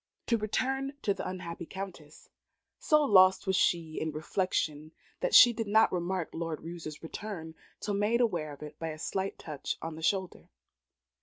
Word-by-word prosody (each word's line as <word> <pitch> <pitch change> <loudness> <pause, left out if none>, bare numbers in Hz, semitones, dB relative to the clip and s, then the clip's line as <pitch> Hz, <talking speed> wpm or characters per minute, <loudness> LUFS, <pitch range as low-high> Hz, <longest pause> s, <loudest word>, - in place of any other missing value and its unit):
To 235 - +2
return 270 +6 -1
to 200 - +2
the - - -5
unhappy 170 -2 -6
Countess. 185 -6 -9 0.5
So 305 -1 +4
lost 190 -7 +6
was 190 -1 +1
she 165 -3 +1
in 160 - -1
reflection, 155 -1 -2 0.3
that - - +1
she 240 -1 +10
did 225 -1 -3
not 220 0 +4
remark 180 -1 -2
Lord 165 -2 -4
Roos's 165 -2 -7
return 165 -2 -6 0.3
till 205 - -3
made 210 +4 +2
aware 175 -11 0
of 145 +1 -10
it 150 0 -10
by 165 - -3
a 155 - -6
slight 190 +4 -3
touch 150 -3 -5
on 165 0 -5
the 160 - -9
shoulder. 190 +2 -1
180 Hz, 170 wpm, -30 LUFS, 160-205 Hz, 0.5 s, she